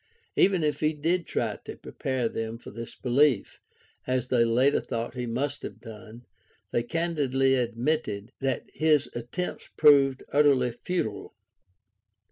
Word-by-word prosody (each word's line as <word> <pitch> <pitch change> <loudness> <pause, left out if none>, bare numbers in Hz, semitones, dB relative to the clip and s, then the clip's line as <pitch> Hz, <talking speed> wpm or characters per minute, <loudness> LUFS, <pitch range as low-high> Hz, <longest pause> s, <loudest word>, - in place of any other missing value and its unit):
Even 190 -4 +3
if 150 -1 0
he 155 0 +1
did 165 +3 0
try - - -2
to - - -8
prepare 130 -3 -2
them 115 0 -4
for - - -11
this 115 +2 -8
belief 130 -3 +2 0.2
— - - -34
^as 130 -1 -1
they 120 -2 +4
later 125 +5 +3
thought 115 0 -4
he 125 -1 -4
must 135 +5 -2
have - - -8
done 110 +1 -11 0.2
— 105 -3 -38
they 120 - +1
candidly 135 -2 +1
admitted 120 -3 -1
that 135 -2 -1
his 155 -3 +2
attempts 120 +10 -5
proved 140 -3 +5
utterly 140 -4 +4
futile. 120 - -4
130 Hz, 145 wpm, -27 LUFS, 115-150 Hz, 0.2 s, proved